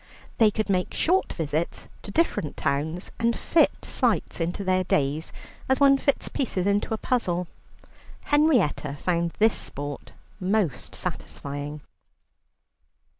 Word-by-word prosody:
They 220 Hz, -2 st, +7 dB
could 215 Hz, +1 st, -2 dB
make 185 Hz, -2 st, 0 dB
short 370 Hz, +4 st, +2 dB
visits 160 Hz, 0 st, -2 dB
to -, -, -10 dB
different 200 Hz, -, 0 dB
towns, 155 Hz, +5 st, -1 dB
and 230 Hz, 0 st, +1 dB
fit 330 Hz, -, +2 dB
sights -, -, 0 dB
into 175 Hz, +4 st, -2 dB
their 185 Hz, -1 st, +2 dB
days, 150 Hz, -1 st, 0 dB, 0.4 s
as 265 Hz, -, +3 dB
one 275 Hz, -1 st, +6 dB
fits 280 Hz, -, +1 dB
pieces 195 Hz, -9 st, -1 dB
into 205 Hz, +2 st, +1 dB
a -, -, -6 dB
puzzle. 180 Hz, -8 st, 0 dB, 0.8 s
Henrietta 260 Hz, -, +2 dB
found 170 Hz, -1 st, 0 dB
this 220 Hz, +1 st, +4 dB
sport 145 Hz, 0 st, -6 dB, 0.3 s
most 185 Hz, -, 0 dB
satisfying. 145 Hz, +1 st, -5 dB
185 Hz, 125 wpm, -26 LUFS, 155-230 Hz, 0.8 s, They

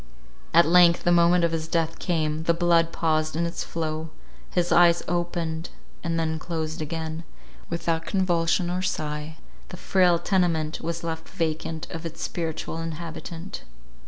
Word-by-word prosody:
At 170 Hz, +1 st, +6 dB
length 170 Hz, 0 st, +6 dB
the 175 Hz, -, +3 dB
moment 175 Hz, 0 st, +5 dB
of 170 Hz, -, +2 dB
his 160 Hz, -1 st, -2 dB
death 165 Hz, -1 st, -1 dB
came: 160 Hz, -2 st, -1 dB
the 170 Hz, -, +3 dB
blood 170 Hz, -1 st, +3 dB
paused 155 Hz, -2 st, 0 dB
in 170 Hz, +1 st, +1 dB
its 170 Hz, +1 st, -3 dB
flow 160 Hz, -1 st, -3 dB, 0.4 s
—his 175 Hz, -1 st, 0 dB
eyes 170 Hz, 0 st, +5 dB
opened, 170 Hz, -1 st, -2 dB, 0.3 s
and 165 Hz, 0 st, -1 dB
then 160 Hz, -1 st, -1 dB
closed 160 Hz, -2 st, -4 dB
again: 160 Hz, +1 st, -4 dB, 0.5 s
without 165 Hz, -1 st, -1 dB
convulsion 175 Hz, -2 st, +1 dB
or 180 Hz, +1 st, -1 dB
sigh, 155 Hz, -3 st, -3 dB, 0.3 s
the -, -, -8 dB
frail 180 Hz, -3 st, +3 dB
tenement 165 Hz, -4 st, 0 dB
was 170 Hz, 0 st, -3 dB
left 165 Hz, -1 st, -4 dB
vacant 160 Hz, -2 st, -2 dB
of 165 Hz, -1 st, -6 dB
its 165 Hz, -1 st, -6 dB
spiritual 165 Hz, -1 st, -3 dB
inhabitant. 165 Hz, +2 st, -6 dB
165 Hz, 150 wpm, -25 LUFS, 160-175 Hz, 0.5 s, At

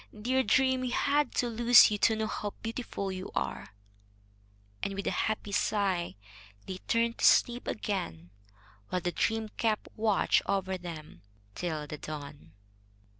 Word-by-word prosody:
"Dear 260 Hz, +4 st, +2 dB
dream, 260 Hz, +3 st, +2 dB
we 255 Hz, -, -2 dB
had 285 Hz, +4 st, +1 dB
to 245 Hz, -, +1 dB
lose 235 Hz, 0 st, +7 dB
you 210 Hz, -, -1 dB
to 220 Hz, -, +4 dB
know 220 Hz, 0 st, -1 dB
how 210 Hz, -1 st, -4 dB
beautiful 225 Hz, -4 st, -4 dB
you 185 Hz, 0 st, -6 dB
are!" 65 Hz, +9 st, -3 dB, 1.1 s
And 200 Hz, 0 st, -2 dB
with 200 Hz, -, -4 dB
a -, -, +1 dB
happy 215 Hz, -1 st, -2 dB
sigh 195 Hz, -4 st, 0 dB, 0.5 s
they 185 Hz, -1 st, -6 dB
turned 230 Hz, 0 st, +1 dB
to -, -, +2 dB
sleep 245 Hz, +1 st, +4 dB
again, 90 Hz, -, -3 dB, 0.6 s
while 180 Hz, -, -1 dB
the 175 Hz, -, -1 dB
dream 220 Hz, +4 st, -1 dB
kept 220 Hz, -2 st, 0 dB
watch 215 Hz, -2 st, +2 dB
over 190 Hz, -1 st, 0 dB
them 170 Hz, -4 st, -9 dB, 0.3 s
till 155 Hz, -, -3 dB
the 150 Hz, 0 st, -7 dB
dawn. 140 Hz, -, -8 dB
205 Hz, 150 wpm, -30 LUFS, 175-230 Hz, 1.1 s, lose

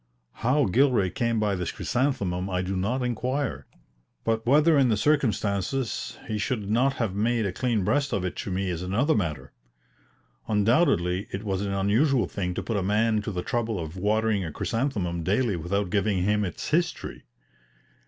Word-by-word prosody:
How 135 Hz, +4 st, +2 dB
Gilray 115 Hz, -2 st, +3 dB
came 115 Hz, -2 st, 0 dB
by 105 Hz, -2 st, +1 dB
this 90 Hz, -2 st, -2 dB
chrysanthemum 100 Hz, -9 st, -1 dB
I 90 Hz, -1 st, -1 dB
do 95 Hz, +1 st, -3 dB
not 115 Hz, +8 st, -1 dB
inquire, 125 Hz, +2 st, -2 dB, 0.6 s
but 115 Hz, 0 st, 0 dB
whether, 155 Hz, +5 st, +5 dB
in 135 Hz, -3 st, +4 dB
the 110 Hz, -, +2 dB
circumstances, 110 Hz, -, 0 dB
he 110 Hz, -1 st, -2 dB
should 105 Hz, 0 st, -2 dB
not 130 Hz, +5 st, +3 dB
have 115 Hz, -7 st, -2 dB
made 115 Hz, +2 st, +1 dB
a 100 Hz, -, -1 dB
clean 120 Hz, -4 st, 0 dB
breast 140 Hz, +8 st, +1 dB
of 95 Hz, -2 st, -1 dB
it 90 Hz, -, -3 dB
to -, -, -4 dB
me 95 Hz, 0 st, -1 dB
is 85 Hz, -1 st, -4 dB
another 110 Hz, -, +1 dB
matter. 75 Hz, -, -2 dB, 0.9 s
Undoubtedly 105 Hz, -, +2 dB
it 95 Hz, +2 st, -5 dB
was 95 Hz, -2 st, -2 dB
an 100 Hz, -1 st, -2 dB
unusual 115 Hz, +8 st, +2 dB
thing 90 Hz, -3 st, -3 dB
to -, -, -3 dB
put 115 Hz, -, -2 dB
a -, -, 0 dB
man 105 Hz, +3 st, +2 dB
to 105 Hz, -, -4 dB
the 90 Hz, -2 st, -3 dB
trouble 115 Hz, -4 st, -1 dB
of 80 Hz, 0 st, -6 dB
watering 105 Hz, +1 st, +1 dB
a 80 Hz, -, -4 dB
chrysanthemum 100 Hz, -, -2 dB
daily 105 Hz, +5 st, +1 dB
without 90 Hz, +3 st, -2 dB
giving 100 Hz, -2 st, +1 dB
him 105 Hz, +2 st, +2 dB
its 90 Hz, -, -4 dB
history. 170 Hz, +3 st, -1 dB
105 Hz, 175 wpm, -26 LUFS, 95-125 Hz, 0.9 s, whether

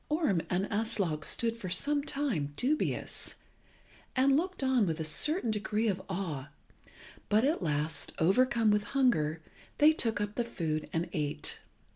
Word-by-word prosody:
Orm 300 Hz, -, +1 dB
and 185 Hz, +2 st, +1 dB
Aslog 200 Hz, -8 st, -1 dB
stood 230 Hz, +6 st, 0 dB
for 200 Hz, -6 st, -6 dB
some 285 Hz, +11 st, +2 dB
time 255 Hz, -, -1 dB
dubious, 290 Hz, -, -1 dB, 0.8 s
and 270 Hz, +1 st, +4 dB
looked 360 Hz, 0 st, -1 dB
on 255 Hz, -6 st, +3 dB
with 160 Hz, 0 st, -2 dB
a -, -, -1 dB
certain 245 Hz, -, 0 dB
degree 215 Hz, +1 st, -1 dB
of 190 Hz, -3 st, 0 dB
awe, 165 Hz, -8 st, -4 dB, 0.8 s
but 215 Hz, +2 st, +4 dB
at 290 Hz, -1 st, +1 dB
last, 150 Hz, -1 st, 0 dB
overcome 230 Hz, +5 st, +3 dB
with 210 Hz, 0 st, +2 dB
hunger, 160 Hz, -, +2 dB, 0.3 s
they 305 Hz, +2 st, +6 dB
took 225 Hz, -8 st, 0 dB
up 205 Hz, 0 st, -2 dB
the 240 Hz, -, -1 dB
food 160 Hz, -9 st, -3 dB
and 165 Hz, +2 st, -1 dB
ate. 150 Hz, -4 st, -2 dB
210 Hz, 150 wpm, -31 LUFS, 165-260 Hz, 0.8 s, they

